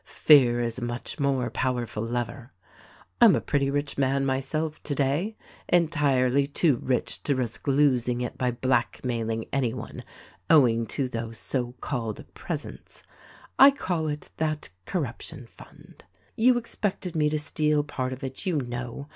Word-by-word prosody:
Fear 125 -6 +5
is 115 +1 -2
a - - -5
much 120 +5 -5
more 135 -3 0
powerful 120 -4 -2
lever. 120 +2 -4 0.7
I'm - - +8
a - - +1
pretty 140 -1 0
rich 140 0 -2
man 135 0 +2
myself 145 +4 -2
today 145 +9 -1
— - - -24
entirely 140 -6 +3
too 145 -1 +2
rich 125 +1 -2
to 140 - 0
risk 125 -1 -4
losing 130 -4 +2
it 125 - -4
by 125 - 0
blackmailing 120 -2 -1
any 130 -5 0
one - - -7 0.3
— 90 - -29
owing 115 -7 +5
to 135 +4 -1
those 115 -2 -5
so 120 +1 -2
called 115 -5 -4
presents. - - -7 0.6
I 275 - +11
call 180 - -2
it 150 0 -5
"That 155 -1 -2 0.2
corruption 145 -4 -4
fund.' - - -17 0.3
You 245 +2 +4
expected 205 -6 -3
me 150 -1 +2
to 155 - 0
steal 150 0 +1
part 130 -3 -3
of 130 +1 -7
it, 130 0 -5
you 185 -4 0
know. 120 +1 -5
135 Hz, 155 wpm, -26 LUFS, 120-150 Hz, 0.7 s, I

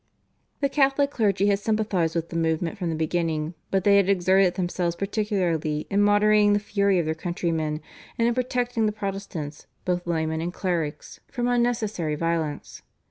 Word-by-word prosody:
The 280 - +3
Catholic 275 0 +2
clergy 200 -5 +1
had 200 -1 +3
sympathised 205 -6 0
with 165 0 -2
the - - -6
movement 165 +2 0
from 180 -5 -3
the 165 - -1
beginning, 160 0 -1 0.2
but 195 -1 +1
they 200 0 +5
had 200 -1 +3
exerted 190 -1 +3
themselves 175 -2 -1
particularly 180 -7 -1
in 200 +1 +3
moderating 205 0 +4
the 205 - +3
fury 200 -2 +1
of 170 - +1
their 160 - 0
countrymen, 160 -2 -2 0.4
and 230 - +2
in 240 - +2
protecting 245 -2 0
the - - +1
Protestants, 195 -7 -5 0.2
both 175 -1 -1
laymen 160 -1 -1
and 170 +2 -2
clerics, 170 -5 -3
from 245 -2 -2
unnecessary 230 -10 0
violence. 160 -2 -3
185 Hz, 165 wpm, -25 LUFS, 165-210 Hz, 0.4 s, they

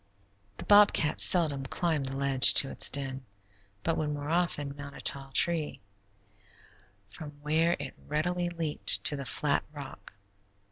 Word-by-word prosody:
The - - -6
bobcat 205 -7 +3
seldom 145 -7 +3
climbed 155 -3 -2
the 135 - -5
ledge 135 -1 +5
to 135 - +4
its - - +3
den, 135 -1 -2 0.6
but 165 - -1
would 155 -1 -2
more 145 +1 -5
often 155 -5 -2
mount 140 0 -10
a - - -10
tall 135 -1 -2
tree, 160 +1 +1 1.3
from 150 +9 -11
where 160 +3 +1
it 140 -2 -7
readily 175 +4 -2
leaped 165 -3 -4
to 150 - +2
the 140 -1 -7
flat 145 +2 0
rock. 135 -10 -11
150 Hz, 145 wpm, -28 LUFS, 140-165 Hz, 1.3 s, ledge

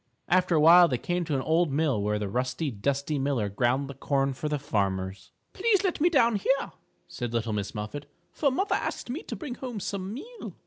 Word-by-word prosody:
After 180 -1 +3
a - - +4
while 170 +3 +8
they 125 - 0
came 175 +6 -2
to 150 - -1
an 135 - 0
old 165 0 +2
mill 140 -6 +1
where 105 +1 0
the 105 -1 -3
rusty, 125 +7 -2
dusty 140 +6 -1
miller 135 -7 0
ground 125 +7 0
the 140 - -7
corn 135 0 0
for 150 +4 -4
the 150 - 0
farmers. 95 -8 -2 0.2
"Please 410 -1 +2
let 365 -6 -1
me 345 - +5
down 235 -9 +3
here," 270 +7 0 0.4
said 120 -2 -5
little 115 -1 -1
Miss 105 0 -3
Muffet, 110 +8 -6 0.2
"for 290 - +1
mother 385 +10 0
asked - - -2
me 305 +8 -4
to - - -6
bring 295 -7 -6
home 245 -4 -6
some 195 0 -4
meal." 440 - -8
145 Hz, 215 wpm, -27 LUFS, 120-205 Hz, 0.4 s, while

